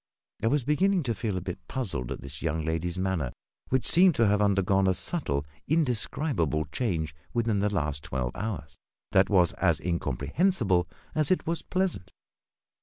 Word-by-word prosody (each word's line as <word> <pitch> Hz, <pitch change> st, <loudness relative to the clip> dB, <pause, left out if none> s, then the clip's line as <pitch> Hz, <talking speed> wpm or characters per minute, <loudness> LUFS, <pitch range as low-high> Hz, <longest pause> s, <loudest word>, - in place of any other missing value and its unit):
I 115 Hz, -, +1 dB
was 145 Hz, +3 st, +2 dB
beginning 180 Hz, +6 st, +2 dB
to 120 Hz, -3 st, 0 dB
feel 100 Hz, -1 st, -2 dB
a -, -, -3 dB
bit 90 Hz, 0 st, -5 dB
puzzled 80 Hz, -, -3 dB
at -, -, -5 dB
this -, -, -9 dB
young 80 Hz, +1 st, -1 dB
lady's 80 Hz, +2 st, -2 dB
manner, 95 Hz, -8 st, -1 dB, 0.4 s
which 130 Hz, -2 st, +1 dB
seemed 180 Hz, -2 st, +7 dB
to 115 Hz, -, +3 dB
have 105 Hz, 0 st, +3 dB
undergone 95 Hz, -1 st, +3 dB
a 95 Hz, -, +3 dB
subtle, 70 Hz, -, 0 dB, 0.2 s
indescribable 125 Hz, -, 0 dB
change 80 Hz, -, -1 dB, 0.2 s
within 115 Hz, -3 st, +1 dB
the 105 Hz, +1 st, +1 dB
last 75 Hz, -6 st, -2 dB
twelve 65 Hz, -2 st, -2 dB
hours 100 Hz, -9 st, -5 dB, 0.4 s
that 95 Hz, 0 st, +4 dB
was 90 Hz, -4 st, +4 dB
as 85 Hz, -4 st, +2 dB
incomprehensible 90 Hz, -, 0 dB, 0.3 s
as 155 Hz, -1 st, +1 dB
it 185 Hz, -, +1 dB
was 165 Hz, +1 st, -1 dB
pleasant. 180 Hz, -, -2 dB
95 Hz, 165 wpm, -28 LUFS, 85-130 Hz, 0.4 s, seemed